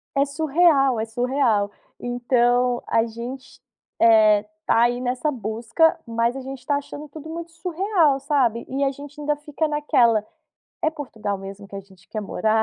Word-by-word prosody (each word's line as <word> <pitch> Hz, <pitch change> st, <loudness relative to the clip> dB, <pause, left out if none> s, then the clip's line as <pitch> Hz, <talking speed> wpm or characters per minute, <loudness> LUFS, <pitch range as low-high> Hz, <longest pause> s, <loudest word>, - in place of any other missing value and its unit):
É 275 Hz, 0 st, +3 dB
surreal, 285 Hz, -3 st, +3 dB
é 220 Hz, -, -1 dB
surreal. 230 Hz, -3 st, +1 dB, 0.3 s
Então 245 Hz, 0 st, +1 dB
a 225 Hz, 0 st, +2 dB
gente, 240 Hz, +3 st, -8 dB, 0.4 s
eh, 215 Hz, -2 st, +6 dB, 0.2 s
tá 230 Hz, -, +3 dB
aí 240 Hz, +1 st, +2 dB
nessa 255 Hz, +4 st, -1 dB
busca, 235 Hz, -, +1 dB
mas 230 Hz, +1 st, 0 dB
a 270 Hz, -, -5 dB
gente 265 Hz, 0 st, -8 dB
tá 285 Hz, -, +1 dB
achando 290 Hz, +1 st, -6 dB
tudo 310 Hz, +2 st, -10 dB
muito 335 Hz, +1 st, -6 dB
surreal, 335 Hz, -3 st, +1 dB
sabe. 255 Hz, -6 st, +1 dB
E 275 Hz, +2 st, -1 dB
a 275 Hz, -, +2 dB
gente 285 Hz, +2 st, -11 dB
ainda 295 Hz, 0 st, 0 dB
fica 295 Hz, +1 st, -2 dB
naquela: 250 Hz, -8 st, +2 dB, 0.6 s
é -, -, +3 dB
Portugal 220 Hz, -10 st, -4 dB
mesmo 195 Hz, +1 st, -9 dB
que 200 Hz, -, -13 dB
a 195 Hz, -, -4 dB
gente 190 Hz, -3 st, -21 dB
quer 215 Hz, -, -4 dB
morar? 220 Hz, +2 st, +1 dB
250 Hz, 165 wpm, -23 LUFS, 225-290 Hz, 0.6 s, eh